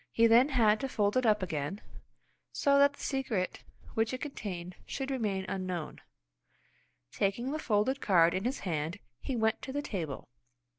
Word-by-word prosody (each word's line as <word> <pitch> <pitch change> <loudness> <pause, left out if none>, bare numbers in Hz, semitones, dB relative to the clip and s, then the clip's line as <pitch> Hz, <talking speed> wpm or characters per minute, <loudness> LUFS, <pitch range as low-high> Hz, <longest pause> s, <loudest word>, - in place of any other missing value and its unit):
He 230 - +4
then 235 +5 +6
had 220 -6 +4
to 270 - -3
fold 205 -3 +1
it 255 -2 +3
up 210 -2 +3
again, 160 +2 -3 0.7
so 280 0 +3
that 285 0 +5
the - - -11
secret 240 -9 -2 0.3
which 225 +2 0
it 255 - -9
contained 185 - -5
should 270 0 -3
remain 205 -7 -1
unknown. 185 -4 -4 1.1
Taking 215 - -1
the 310 - -2
folded 245 +3 +1
card 170 -4 +4
in 185 - -1
his 255 +3 -2
hand, 165 0 -2 0.2
he 270 - -3
went 220 -1 +1
to 265 - -6
the 290 +2 -2
table. 165 - -4
215 Hz, 165 wpm, -31 LUFS, 185-265 Hz, 1.1 s, then